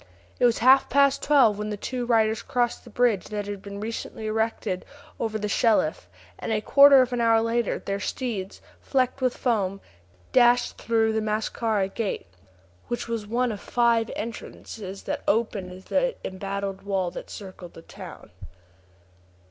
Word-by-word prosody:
It - - +4
was 235 -1 +3
half 265 +1 +6
past 280 +1 +3
twelve 250 -8 +4
when 210 0 -3
the 210 - -3
two 245 +3 -4
riders 220 -2 +2
crossed 240 -1 -1
the - - -11
bridge 230 -4 +1
that 210 -1 -4
had 205 -1 -6
been 200 0 -8
recently 220 0 -5
erected 215 -3 -1 0.4
over 220 -1 -1
the 210 -1 -3
Shelif, 205 - +1 0.3
and - - -4
a 215 - +2
quarter 275 +4 +7
of 250 0 -5
an 245 - 0
hour 230 -1 +4
later 230 0 0
their 200 0 -4
steeds, 200 -2 -4 0.2
flecked 260 0 0
with 255 -1 0
foam, 195 -6 0 0.5
dashed 245 -1 +4
through 225 -1 +1
the 220 - 0
Mascara 215 -1 -1
Gate, 200 +1 -3 0.6
which 240 - -3
was 230 -3 -3
one 240 +2 0
of 205 - -6
five 235 -2 +2
entrances 210 -3 -7 0.2
opened 205 -4 0
in 180 - -10
the - - 0
embattled 195 +1 -4
wall 190 -3 -1
that - - -7
encircled 185 -3 -10
the 165 - -12
town. - - -11
220 Hz, 160 wpm, -25 LUFS, 200-240 Hz, 0.6 s, quarter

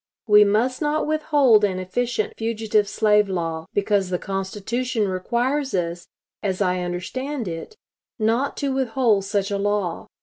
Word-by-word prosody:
We 210 -1 +7
must 225 +7 +1
not 300 0 0
withhold 290 -8 +3
an 190 -3 +1
efficient 215 +4 -2
fugitive 220 -2 0
slave 210 -2 +3
law, 165 -3 -3
because 200 -2 +1
the 180 - 0
Constitution 205 +5 -2
requires 245 +9 -1
us, 175 -1 -3 0.3
as 190 -2 -2
I 185 -2 +1
understand 220 +9 -4
it, 165 - -6 0.4
not 230 +5 0
to 280 -2 -1
withhold 240 -6 +1
such 200 0 -1
a 200 - -1
law. 200 -4 -1
210 Hz, 140 wpm, -23 LUFS, 190-245 Hz, 0.4 s, We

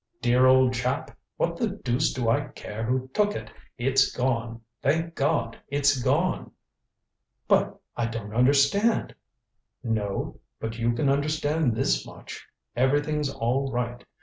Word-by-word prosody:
"Dear 125 +2 +4
old 130 -1 +5
chap. 130 +6 -2 0.2
What 170 0 0
the 230 - +1
deuce 150 - 0
do 125 -3 -2
I 115 - +2
care 105 +2 -7
who 130 +2 -1
took 210 0 +2
it. 110 0 -6 0.3
It's 135 +2 +3
gone. 115 -2 -1 0.2
Thank 165 +4 +1
God 140 -7 0
it's 140 -1 +2
gone." - - +1 1.0
"But - - +2 0.2
I 120 -1 0
don't 115 -3 -6
understand 140 - +3 0.4
" 120 -1 -52
"No. 110 -4 -2 0.2
But 115 +1 -5
you 120 +1 +1
can 130 +5 0
understand 145 -1 +1
this - - +1
much. - - -10 0.3
Everything's 145 +3 +1
all 130 +3 -1
right. 120 0 -3
130 Hz, 140 wpm, -26 LUFS, 115-145 Hz, 1.0 s, old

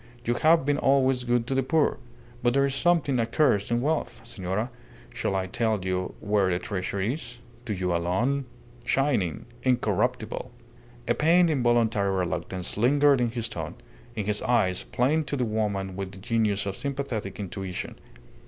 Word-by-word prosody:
You 120 - +2
have 155 +3 +4
been 145 0 +1
always 135 -2 +3
good 120 -1 +1
to 135 - -2
the 135 - +2
poor. 150 +2 +1 0.4
But 120 +1 +2
there 140 0 +4
is 140 - -1
something 145 -3 +2
accursed 115 -2 +2
in 120 0 +1
wealth. 155 +4 -1
Senora, 110 0 -3 0.4
shall 95 - -1
I 95 -1 0
tell 110 -1 -1
you 90 0 -2
where 100 -2 +1
the 90 - +1
treasure 95 +1 -3
is? 120 +4 -3 0.3
To 110 - -2
you 90 -2 0
alone.... 115 +12 0 0.4
Shining! 125 - 0 0.2
Incorruptible!" 120 -1 0 0.6
A 120 - +3
pained, 170 +3 +4
involuntary 120 -6 +2
reluctance 90 +1 -3
lingered 140 +3 +4
in 120 - +2
his 115 0 -3
tone, 80 -8 -5 0.4
in 105 -3 -2
his 105 0 -1
eyes, 100 -7 +2
plain 135 +6 +1
to 145 - -2
the 125 - +1
woman 100 -4 -2
with 95 0 -5
the - - -10
genius 105 -1 0
of 100 -1 -3
sympathetic 135 -5 -4
intuition. 95 -2 -5
115 Hz, 160 wpm, -26 LUFS, 100-135 Hz, 0.6 s, have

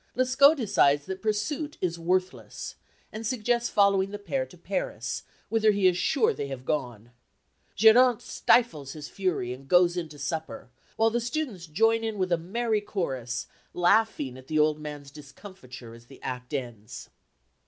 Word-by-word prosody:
Lescaut 265 +4 +5
decides 155 - +2
that 190 0 -6
pursuit 270 +9 -2
is 170 -2 -2
worthless, 185 +2 -2 0.4
and 215 +1 -6
suggests 235 +1 0
following 200 -2 +3
the 205 - -6
pair - - -3
to - - -16
Paris, - - -3 0.3
whither 220 -1 +2
he 200 -2 +2
is 180 -1 +5
sure 440 - +2
they 140 - -4
have 130 -2 -7
gone. 120 -7 -3 0.6
Geronte 230 +3 +5
stifles 155 - +1
his 150 -1 -8
fury 175 -11 -2
and 135 +2 -12
goes 175 +1 +4
in 170 -3 -3
to 150 - -12
supper, 145 -3 -5 0.2
while 225 0 +3
the 240 +1 0
students 235 - -4
join 225 +8 +2
in 220 -2 -3
with 185 -1 -1
a 170 - +4
merry 215 +5 -1
chorus, 135 - -3 0.3
laughing 175 - +2
at 130 - -16
the 155 - -1
old 150 0 +3
man's 145 -2 -8
discomfiture 135 - -12
as 115 0 -15
the 135 - -15
act 125 -1 -5
ends. 120 -7 -6
185 Hz, 165 wpm, -27 LUFS, 140-225 Hz, 0.6 s, Lescaut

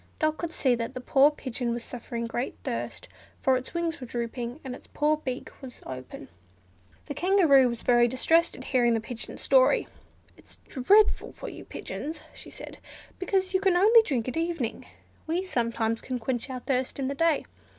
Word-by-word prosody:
Dot 310 -1 +1
could 335 0 -4
see 265 -5 +2
that 235 +2 -3
the - - -3
poor 270 +3 +5
pigeon 250 -5 -3
was 240 - -5
suffering 235 -1 -5
great 240 +2 -3
thirst, - - -4 0.3
for 265 - +3
its 255 +5 -4
wings 335 -3 -2
were 250 - -6
drooping, 240 +2 -4
and 260 -3 -5
its - - -12
poor 300 +1 +2
dry - - -21
beak 255 -1 -4
was 255 -3 -10
open. 130 -1 -8 0.8
The 290 - -5
Kangaroo 315 -7 +5
was 235 -1 -5
very 240 -1 +5
distressed 325 +7 +3
at - - -8
hearing 240 -3 +2
the - - +1
pigeon's 230 +1 -8
story. - - +4 0.5
"It - - -21
is - - -14
dreadful 405 +11 +3
for - - -7
you - - -10
pigeons," 315 +3 -6
she - - -12
said, - - -10 0.4
"because 375 0 0
you 375 - +2
can 380 -3 +3
only 445 +5 +7
drink 260 - -2
at 255 - -3
evening; 330 -8 -2 0.4
we 340 +4 0
sometimes 230 -8 -1
can 255 -1 -3
quench 245 +2 -3
our 260 - -4
thirst 255 0 -1
in 270 -2 -1
the 275 - -1
day. 320 0 +1
265 Hz, 190 wpm, -27 LUFS, 240-330 Hz, 0.8 s, only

